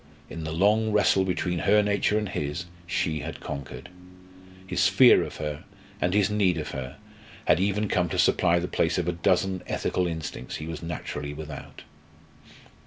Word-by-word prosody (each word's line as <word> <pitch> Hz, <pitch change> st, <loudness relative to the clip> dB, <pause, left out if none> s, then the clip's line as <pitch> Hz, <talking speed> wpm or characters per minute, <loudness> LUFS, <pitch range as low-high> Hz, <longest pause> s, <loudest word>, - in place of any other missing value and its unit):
In 80 Hz, 0 st, -6 dB
the 80 Hz, -, -3 dB
long 105 Hz, +6 st, +2 dB
wrestle 100 Hz, -2 st, +3 dB
between 90 Hz, -1 st, -1 dB
her 105 Hz, +3 st, +4 dB
nature 105 Hz, +1 st, +1 dB
and 105 Hz, -1 st, -1 dB
his, 75 Hz, 0 st, -3 dB, 0.2 s
she 80 Hz, -2 st, -1 dB
had 80 Hz, +2 st, -6 dB
conquered. 70 Hz, +5 st, -7 dB, 0.8 s
His 95 Hz, 0 st, +2 dB
fear 105 Hz, +7 st, +6 dB
of -, -, -7 dB
her 75 Hz, -1 st, -5 dB, 0.4 s
and 90 Hz, +2 st, +1 dB
his 105 Hz, -2 st, +4 dB
need 100 Hz, -5 st, +2 dB
of 75 Hz, -, -4 dB
her 65 Hz, -2 st, -6 dB, 0.5 s
had -, -, +4 dB
even 100 Hz, +2 st, +1 dB
come 90 Hz, -3 st, +1 dB
to -, -, -3 dB
supply 85 Hz, -1 st, +3 dB
the 85 Hz, +1 st, -1 dB
place 85 Hz, 0 st, 0 dB
of 90 Hz, -2 st, -1 dB
a -, -, +2 dB
dozen 95 Hz, +2 st, +1 dB
ethical 90 Hz, -1 st, -1 dB
instincts 80 Hz, -6 st, -5 dB
he 80 Hz, -, -6 dB
was 80 Hz, -1 st, -6 dB
naturally 75 Hz, -3 st, -5 dB
without. 75 Hz, -2 st, -9 dB
90 Hz, 175 wpm, -26 LUFS, 80-95 Hz, 0.8 s, fear